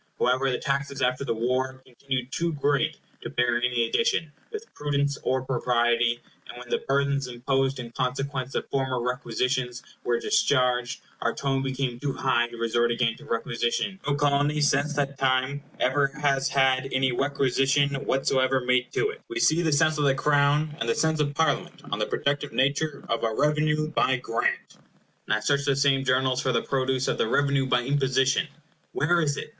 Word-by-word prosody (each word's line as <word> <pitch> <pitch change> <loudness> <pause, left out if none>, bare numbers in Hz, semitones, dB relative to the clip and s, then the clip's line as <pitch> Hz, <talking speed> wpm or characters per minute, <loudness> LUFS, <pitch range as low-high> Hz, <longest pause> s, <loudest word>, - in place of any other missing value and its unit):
However, 130 +2 +2
the 125 - 0
taxes 140 -1 -2
after 125 +2 +1
the 115 - -2
war 130 +3 -1
continued 130 0 -4
too 170 +1 -1
great 145 -1 0 0.2
to - - -6
bear 120 -1 +1
any 120 -1 +1
addition, 165 - 0 0.2
with 435 0 -6
prudence 140 -1 -1
or 130 0 0
propriety; 120 -2 +1 0.3
and - - -9
when 125 0 -10
the - - 0
burthens 140 0 +1
imposed 135 +2 -1
in 120 -2 -7
consequence 130 +1 -3
of - - -2
former 130 -2 0
requisitions 125 0 -2 0.2
were 120 -1 0
discharged, 125 - +1 0.2
our 115 - 0
tone 135 -1 -1
became 135 -2 -2
too 140 +1 -2
high 120 -3 +1
to 120 0 -11
resort 115 +1 +1
again 115 -1 0
to 150 - -14
requisition. 120 - -2
No 145 - +2
Colony, 145 +1 +1
since 145 +1 +1
that 140 -1 -2
time, 130 +1 +1 0.2
ever 140 +2 +2
has 135 -2 +1
had 135 0 +2
any 130 0 +1
requisition 140 +1 +1
whatsoever 135 0 +1
made 125 0 +1
to 425 +1 +1
it. 460 - -13
We 360 -2 -3
see 170 - +3
the 160 -2 +1
sense 155 +1 +2
of 145 - +2
the 135 -1 +3
Crown, 145 +2 +2
and 115 - -2
the - - +2
sense 160 -1 +1
of 145 -1 0
Parliament, 160 +1 -1
on - - -1
the - - 0
productive 145 +1 -1
nature 140 +2 0
of 115 - -1
a 115 - +1
REVENUE 150 +1 +1
BY 130 -4 +2
GRANT. 115 -2 -2 0.5
Now 110 0 +1
search 140 -1 +1
the 140 -1 +2
same 135 -1 +2
Journals 130 0 +1
for 130 - 0
the 120 - 0
produce 130 -1 0
of - - -1
the - - +2
REVENUE 140 +2 +1
BY 125 -1 +2
IMPOSITION. 135 +3 +1 0.5
Where 170 +4 +2
is 145 -2 0
it? - - -6
135 Hz, 180 wpm, -26 LUFS, 125-145 Hz, 0.5 s, see